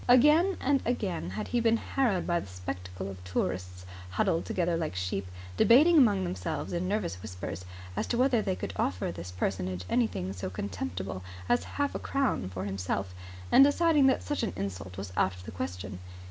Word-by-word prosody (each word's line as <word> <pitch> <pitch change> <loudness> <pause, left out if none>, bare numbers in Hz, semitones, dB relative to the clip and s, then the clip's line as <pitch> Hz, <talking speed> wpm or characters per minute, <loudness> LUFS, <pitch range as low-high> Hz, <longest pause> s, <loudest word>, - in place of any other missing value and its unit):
Again 300 +9 +6
and 275 0 +2
again 200 - -1
had 105 +3 -4
he 240 - +1
been 230 0 +3
harrowed 225 -7 0
by 175 -1 +1
the - - -8
spectacle 90 0 -6
of 95 -2 -8
tourists, 90 0 -3 0.2
huddled 160 - +1
together 175 -2 0
like 160 - -2
sheep, 90 +1 -2 0.3
debating 295 - +7
among 210 -10 +5
themselves 175 -3 -3
in 175 +1 -1
nervous 190 - -1
whispers 90 -3 -6 0.3
as - - -1
to 235 - 0
whether 250 -2 +4
they 190 -3 -1
could - - -5
offer 90 -2 0
this 85 +1 -7
personage 90 0 -2
anything 95 -6 0
so 90 -1 -4
contemptible 95 0 -4 0.3
as 120 - +2
half 285 0 +1
a - - -3
crown 270 - 0
for 95 0 -5
himself 95 -1 -2 0.4
and 270 - +9
deciding 295 0 +5
that 265 - +2
such 290 - -2
an 230 - -1
insult 95 -1 -5
was 95 -1 -6
out 95 - +2
of 90 - -12
the - - -7
question. 90 +2 -5
100 Hz, 185 wpm, -29 LUFS, -, 0.4 s, and